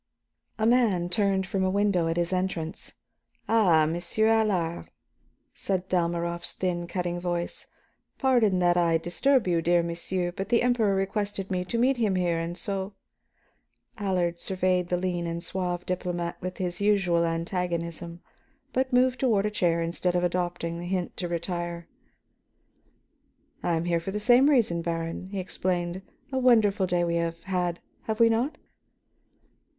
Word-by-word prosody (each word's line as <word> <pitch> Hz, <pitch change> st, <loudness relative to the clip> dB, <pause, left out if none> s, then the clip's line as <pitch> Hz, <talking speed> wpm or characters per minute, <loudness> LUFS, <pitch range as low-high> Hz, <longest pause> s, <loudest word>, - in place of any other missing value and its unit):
A 215 Hz, -, 0 dB
man 220 Hz, -8 st, +3 dB
turned 195 Hz, 0 st, +1 dB
from 190 Hz, 0 st, -1 dB
a 185 Hz, -, +2 dB
window 200 Hz, -3 st, +2 dB
at 165 Hz, +1 st, -1 dB
his 175 Hz, +1 st, 0 dB
entrance. 180 Hz, -2 st, -3 dB, 0.5 s
"Ah, 180 Hz, -9 st, +4 dB
Monsieur 175 Hz, +7 st, 0 dB
Allard?" 210 Hz, -7 st, +1 dB, 0.6 s
said 185 Hz, -2 st, -2 dB
Dalmorov's 170 Hz, -1 st, 0 dB
thin, 175 Hz, -2 st, -2 dB
cutting 175 Hz, 0 st, -2 dB
voice, 175 Hz, -1 st, -3 dB, 0.5 s
"Pardon 240 Hz, -8 st, +3 dB
that 175 Hz, -1 st, +3 dB
I 170 Hz, -2 st, +3 dB
disturb 225 Hz, +9 st, +1 dB
you, 170 Hz, -2 st, +2 dB
dear 170 Hz, +1 st, +3 dB
monsieur, 175 Hz, +1 st, -2 dB
but 195 Hz, +3 st, -5 dB
the 235 Hz, 0 st, +3 dB
Emperor 230 Hz, -5 st, +2 dB
requested 195 Hz, 0 st, -2 dB
me 180 Hz, -1 st, 0 dB
to 230 Hz, -, -2 dB
meet 255 Hz, +3 st, +3 dB
him 215 Hz, -5 st, +1 dB
here, 175 Hz, -2 st, +1 dB
and 170 Hz, +1 st, -4 dB
so 195 Hz, -1 st, -3 dB, 0.5 s
" -, -, -42 dB
Allard 180 Hz, -4 st, 0 dB
surveyed 185 Hz, -1 st, 0 dB
the 180 Hz, -, +1 dB
lean 175 Hz, -1 st, -2 dB
and 170 Hz, 0 st, -4 dB
suave 180 Hz, -1 st, -3 dB
diplomat 175 Hz, -1 st, -2 dB
with 185 Hz, 0 st, -5 dB
his 180 Hz, 0 st, -3 dB
usual 190 Hz, -5 st, +3 dB
antagonism, 170 Hz, 0 st, -3 dB, 0.5 s
but 260 Hz, +1 st, 0 dB
moved 255 Hz, 0 st, +3 dB
toward 220 Hz, -6 st, +2 dB
a 210 Hz, -, 0 dB
chair 170 Hz, -5 st, +1 dB
instead 175 Hz, +2 st, -1 dB
of 175 Hz, -, +1 dB
adopting 175 Hz, -1 st, -2 dB
the 175 Hz, -, -6 dB
hint 180 Hz, -1 st, -2 dB
to 180 Hz, -, -2 dB
retire. 170 Hz, 0 st, -4 dB, 1.7 s
"I 170 Hz, -, +1 dB
am 165 Hz, +1 st, -1 dB
here 170 Hz, -1 st, +1 dB
for 165 Hz, -, -6 dB
the 210 Hz, +2 st, -2 dB
same 245 Hz, +6 st, +5 dB
reason, 220 Hz, -, +2 dB
Baron," 165 Hz, +1 st, -3 dB
he 200 Hz, -1 st, -4 dB
explained. 180 Hz, 0 st, -2 dB, 0.3 s
"A 265 Hz, -, 0 dB
wonderful 220 Hz, -6 st, +4 dB
day 175 Hz, -1 st, +1 dB
we 170 Hz, 0 st, 0 dB
have 170 Hz, 0 st, -2 dB
had, 180 Hz, -2 st, -1 dB, 0.3 s
have 220 Hz, 0 st, -2 dB
we 230 Hz, 0 st, +6 dB
not?" 250 Hz, +7 st, 0 dB
180 Hz, 155 wpm, -27 LUFS, 170-205 Hz, 1.7 s, we